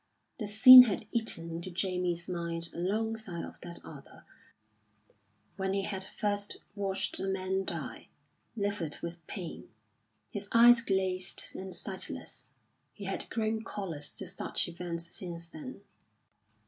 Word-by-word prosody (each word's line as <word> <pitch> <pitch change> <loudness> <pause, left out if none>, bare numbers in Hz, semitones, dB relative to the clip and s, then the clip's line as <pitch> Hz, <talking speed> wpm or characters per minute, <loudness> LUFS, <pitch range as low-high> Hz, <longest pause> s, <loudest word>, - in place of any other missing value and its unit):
The 215 - -3
scene 250 +5 +11
had 215 -1 -2
eaten 225 -8 -1
into 170 +2 -5
Jamie's 180 -1 -1
mind 170 -1 -3
alongside 210 0 -2
of - - -12
that 170 -1 -7
other 140 -3 -12 1.3
when 190 -1 -1
he 195 - 0
had 195 -1 -2
first 205 +1 -2 0.2
watched 195 -1 -1
a 195 - -2
man 190 0 -1
die, - - -5 0.5
livid 200 -7 -2
with 170 0 -6
pain, 180 -5 -7 0.6
his 205 -1 -5
eyes 235 +1 +8
glazed 190 -4 -1
and 190 0 -6
sightless. 190 -2 -5 0.5
He - - -10
had - - -3
grown 220 0 -1
callous 170 -10 -5
to - - -5
such - - -2
events 170 -1 -5
since 170 -2 -5
then. 260 - -9
190 Hz, 130 wpm, -31 LUFS, 170-210 Hz, 1.3 s, scene